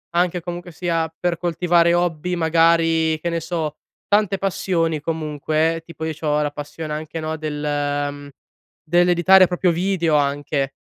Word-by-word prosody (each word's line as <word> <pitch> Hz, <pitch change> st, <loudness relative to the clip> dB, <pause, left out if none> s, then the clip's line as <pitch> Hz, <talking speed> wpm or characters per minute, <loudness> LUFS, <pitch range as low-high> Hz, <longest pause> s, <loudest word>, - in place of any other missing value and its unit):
anche 175 Hz, 0 st, +1 dB
comunque 175 Hz, +1 st, -7 dB
sia 165 Hz, -2 st, -2 dB
per 175 Hz, -1 st, 0 dB
coltivare 170 Hz, 0 st, +2 dB
hobby 175 Hz, 0 st, 0 dB
magari 165 Hz, -1 st, +3 dB
che 170 Hz, -, -2 dB
ne 170 Hz, 0 st, -1 dB
so, 160 Hz, -2 st, -3 dB, 0.3 s
tante 205 Hz, -2 st, +2 dB
passioni, 170 Hz, -5 st, 0 dB
comunque, 155 Hz, +1 st, -1 dB
eh, 165 Hz, -, -6 dB
tipo 165 Hz, -1 st, -8 dB
io 160 Hz, -, -2 dB
c'ho 150 Hz, -1 st, -1 dB
la 145 Hz, -, 0 dB
passione 150 Hz, +1 st, -7 dB
anche, 155 Hz, +1 st, -5 dB
no, 160 Hz, 0 st, -3 dB
del, 155 Hz, -1 st, -4 dB, 0.6 s
mhmm, 145 Hz, 0 st, -10 dB, 0.5 s
dell'editare 175 Hz, +3 st, +5 dB
proprio 180 Hz, +1 st, +1 dB
video 170 Hz, -2 st, 0 dB
anche. 140 Hz, -1 st, 0 dB
165 Hz, 150 wpm, -21 LUFS, 155-175 Hz, 0.6 s, dell'editare